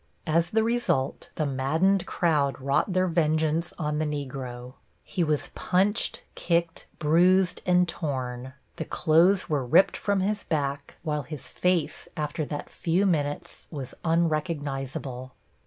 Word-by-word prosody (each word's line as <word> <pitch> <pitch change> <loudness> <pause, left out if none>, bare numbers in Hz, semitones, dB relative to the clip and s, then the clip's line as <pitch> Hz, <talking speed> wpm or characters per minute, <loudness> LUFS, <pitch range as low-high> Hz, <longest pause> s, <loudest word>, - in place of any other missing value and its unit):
As 165 +1 +2
the 220 +2 +2
result, 225 - 0
the 155 - 0
maddened 160 +8 +1
crowd 145 -6 +1
wrought 140 +8 +1
their 185 0 +2
vengeance 160 0 +1
on 150 -2 -1
the 155 - 0
Negro. 130 -4 -5 0.3
He 180 - -1
was 150 -2 0
punched, 195 +4 +1
kicked, 170 -1 -1
bruised 180 +4 +3
and 180 0 +4
torn. 130 -6 -4 0.2
The 160 - -3
clothes 175 +5 +3
were 145 -4 0
ripped 125 +10 +4
from 200 -2 0
his 205 +2 -1
back, 140 -3 -2
while 150 -2 -1
his 145 +1 -8
face 180 -4 -1
after 150 0 -2
that 145 +1 -6
few 175 +4 +1
minutes 145 -6 -2
was 140 -5 -6
unrecognizable. 145 -6 -2
155 Hz, 135 wpm, -27 LUFS, 140-180 Hz, 0.3 s, and